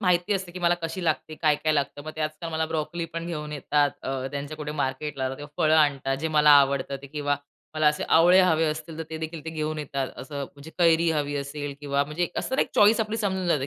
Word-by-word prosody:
माहिती 180 0 +2
असते 185 -2 -4
की 185 - -7
मला 175 0 +3
कशी 165 +2 -4
लागते, 155 0 -1
काय-काय 155 0 +1
लागतं. 145 0 -1
मग 155 - -5
ते - - -5
आजकाल 155 +2 -3
मला 160 0 0
ब्रॉकली 160 +1 -3
पण 165 0 -4
घेऊन 150 -3 -5
येतात. 145 0 +1
अ, 130 -1 -3
त्यांच्या 145 +2 -5
कुठे 150 -1 -5
मार्केटला 135 -1 -2
किंवा 145 +2 -9 0.2
फळं 155 0 +4
आणतात 135 -3 +2
जे 160 - -1
मला 150 -1 +5
आवडत 140 0 0
ते - - -8
किंवा 145 0 -1 0.4
मला 155 -1 +2
असे 150 - -1
आवळे 175 +3 +6
हवे 165 -3 +3
असतील 155 +1 -3
तर - - -2
ते 160 - -4
देखील 160 0 -5
ते 160 - -4
घेऊन 155 -1 -3
येतात. 140 -2 -3
असं 140 +2 -6
म्हणजे 145 +4 -13
कैरी 165 -1 +4
हवी 145 -2 -1
असेल 140 0 -4
किंवा 140 0 0
म्हणजे 160 +4 -2
असं 260 - -2
एक - - +2
चॉईस 215 +2 +5
आपली 220 0 -1
समजून 190 -4 -1
जाते, 140 -4 +1
155 Hz, 230 wpm, -26 LUFS, 145-165 Hz, 0.4 s, आवळे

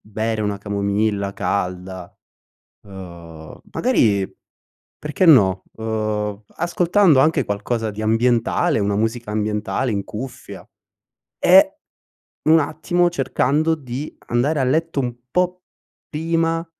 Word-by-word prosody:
bere 110 +1 -3
una 105 -1 -1
camomilla 100 0 -1
calda, 90 -2 -4 0.7
uhm, 85 -5 -11
magari, 105 - +2 0.7
perché, 150 +5 -1
no, 95 - +6
uhm, 110 -2 -2
ascoltando 175 -2 +3
anche 155 -1 +3
qualcosa 110 +2 -2
di 105 +1 -6
ambientale, 115 +6 +2
una 100 0 0
musica 115 +1 -2
ambientale 105 +3 -1
in 100 -1 -2
cuffia. 125 +5 -8 0.7
E, - - +5 0.7
un 160 +1 +5
attimo, 175 +4 0
cercando 150 +1 +1
di 135 0 -6
andare 140 +6 +1
a - - +2
letto 155 +3 0
un 125 -2 -2 0.2
po' 180 0 0 0.5
prima, 165 +1 -1
115 Hz, 105 wpm, -21 LUFS, 100-155 Hz, 0.7 s, no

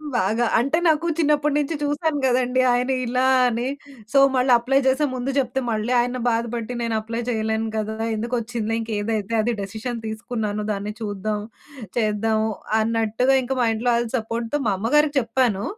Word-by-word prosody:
బాగా. 225 +2 +1
అంటే 275 +6 +1
నాకు 315 +1 +2
చిన్నప్పటి 300 -2 +2
నుంచి 295 +2 -1
చూసాను 290 +1 0
గదండీ. 255 0 +2
ఆయన 250 +2 +1
ఇలా 250 +2 +1 0.2
అని, 240 +1 -2 0.5
సో, 275 - +6 0.2
మళ్ళీ 255 0 +2
అప్లై 260 +3 +2
జేసే 265 +3 +3
ముందు 255 +1 -3
జెప్తే 265 -1 0
మళ్ళీ 220 +2 -1
ఆయన 245 +1 0
బాధ 230 0 +1
బట్టి, 235 +1 -4
నేను 230 -1 -1
అప్లై 230 +2 -4
చేయలేను 220 -1 -1
కదా! 215 0 -2 0.2
ఎందుకొచ్చిందిలే 230 0 -2
ఇంకేదైతే 220 -1 -2
అది 240 +2 0
డిసిషన్ 220 +5 -5
తీసుకున్నాను. 220 -2 -3
దాన్ని 205 +1 -3
చూద్దాం, 210 0 -2 0.6
చేద్దాము 220 0 +1 0.3
అన్నట్టుగా 225 +3 +1
ఇంక 250 - -7
మా - - +3
ఇంట్లో 230 +3 -1
వాళ్ల 235 0 +1
సపోర్ట్‌తో 230 +4 -3
మా 205 - +2
అమ్మ 225 +5 -2
గారికి 295 0 +3
చెప్పాను. 230 -4 0
235 Hz, 160 wpm, -23 LUFS, 220-255 Hz, 0.6 s, సో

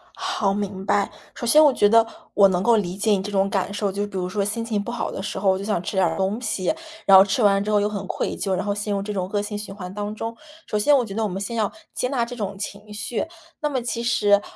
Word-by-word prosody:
好， 370 - 0
明 195 -2 -4
白。 200 0 +2 0.3
首 240 - -5
先 305 +6 +7
我 295 - +7
觉 205 - +4
得 230 +1 +6 0.3
我 200 -1 +7
能 180 -1 0
够 235 -1 +5
理 185 -3 -2
解 215 +2 +1
你 195 -2 +3
这 205 +1 -5
种 195 0 +2
感 195 0 -1
受， 205 -1 -1
就 200 +2 -2
比 195 -2 -6
如 180 - -1
说 200 +2 -1
心 215 +3 -2
情 215 -3 -1
不 235 - -5
好 240 - -3
的 - - -5
时 195 - -4
候， 195 - +2
我 190 - +1
就 195 - -6
想 205 -4 0
吃 190 - -4
点 190 - +4
儿 165 -1 -1
东 195 +4 0
西， 215 - 0 0.3
然 195 -1 +9
后 190 - +9
吃 200 +5 0
完 200 -1 +4
之 210 - -4
后 210 - +4
又 205 - +1
很 210 -2 -4
愧 - - -2
疚， 195 -2 -1
然 185 +2 -1
后 205 - 0
陷 205 0 -2
入 200 - -1
这 210 +1 -4
种 185 -2 -2
恶 205 - +2
性 210 0 -4
循 205 -1 -7
环 185 -2 -8
当 205 0 -4
中。 230 +1 -4 0.3
首 210 - -1
先 290 +7 +5
我 250 - +1
觉 200 - -7
得 225 +2 -1
我 - - +1
们 190 +2 -4
先 215 +4 -4
要 215 -3 0 0.2
接 250 - -1
纳 245 -4 0
这 245 +1 -7
种 200 -4 -4
情 205 +1 -7
绪。 225 +2 -3 0.4
那 300 - +1
么 260 -4 -1
其 235 0 -3
实， 210 -4 +3
205 Hz, 320 characters per minute, -23 LUFS, 195-225 Hz, 0.4 s, 然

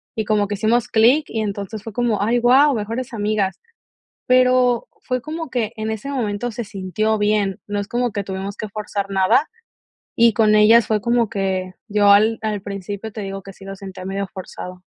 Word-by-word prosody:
y 220 - -2
como 210 -1 +1
que 205 - -3
hicimos 225 +4 +1
clic, 245 +7 +4
y, 220 - -2
entonces, 205 0 -4
fue 225 - -7
como: 235 -3 0
"Ay, 230 +4 +2
guau, 265 +4 +5
mejores 230 +4 -4
amigas". 205 -3 -1 0.7
Pero 255 -1 +3
fue 255 -1 -2
como 320 0 -6
que 230 -4 -1
en 220 0 -3
ese 220 +6 -5
momento 240 -3 -2
se 235 +1 -5
sintió 210 +2 -1
bien, 205 -2 +1
no 205 0 -2
es 200 - -3
como 245 +2 0
que 205 -1 -3
tuvimos 195 +1 -5
que 215 - -5
forzar 205 -1 -4
nada, 195 +9 +3 0.7
y 235 0 +5
con 215 0 +3
ellas 215 +2 +6
fue 215 -1 +1
como 235 0 +2
que 190 -3 -2
yo 205 -1 +3
al 215 +3 +5
al 210 -2 -2
principio 200 +2 -6
te 215 - -6
digo 195 0 -6
que 195 - -10
sí 195 - -15
lo 195 0 -7
sentía 190 -1 -9
medio 195 +1 -3
forzado. 180 -1 -8
215 Hz, 195 wpm, -20 LUFS, 200-235 Hz, 0.7 s, ellas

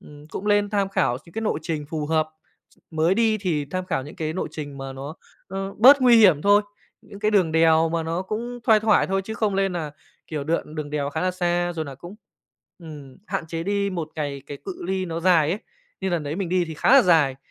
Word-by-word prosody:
ừm, 150 0 -14
cũng 195 +5 -6
lên 205 0 +2
tham 200 -2 0
khảo 130 -10 0
x - - -21
những 170 - -17
cái 225 - -4
lộ 220 - 0
trình 150 -3 -4
phù 150 -1 -4
hợp. 155 0 +1 0.6
Mới 160 +3 +2
đi 220 0 +2
thì 170 -7 -1
tham 185 0 -3
khảo 160 -7 -1
những 150 +7 -11
cái 155 -3 -3
nộ 185 - -3
trình 145 -2 -7
mà 135 0 -6
nó 135 +3 -7 0.3
nó 195 +1 -5
bớt 270 +6 +8
nguy 245 -2 +7
hiểm 180 -9 +5
thôi, 205 +1 +5 0.4
những 200 - -12
cái 210 - +1
đường 185 -6 +2
đèo 160 0 +4
mà 165 0 -1
nó 165 +3 -2
cũng 235 +5 -5
thoai 220 -3 +5
thoải 215 -1 +3
thôi, 195 0 -1
chứ 220 - -5
không 210 -2 0
lên 195 -1 +1
nà 160 -4 -4 0.4
kiểu 150 -3 -4
đường- 160 -1 -2
đường 150 -2 -5
đèo 145 -1 -2
khá 160 - -3
là 185 - +1
xa. 175 -1 -1
Rồi 160 -2 -4
là 140 -2 -8
cũng, 175 +8 -11 0.6
ừm, 150 -6 -11
hạn 195 -5 -3
chế 165 0 -4
đi 200 +1 -1
một 170 -4 -4
ngày 140 -3 -4
cái 145 - -7
cự 190 - -7
ly 190 0 -1
nó 165 -1 -4
dài 165 -4 +4
ấy. 195 - -1 0.4
Như 190 - -1
lần 170 -3 -1
đấy 150 +3 -4
mình 195 -4 -3
đi 180 0 +1
thì 160 -2 -7
khá - - -1
là 275 -1 +8
dài, 155 - +3
175 Hz, 250 wpm, -23 LUFS, 155-195 Hz, 0.6 s, bớt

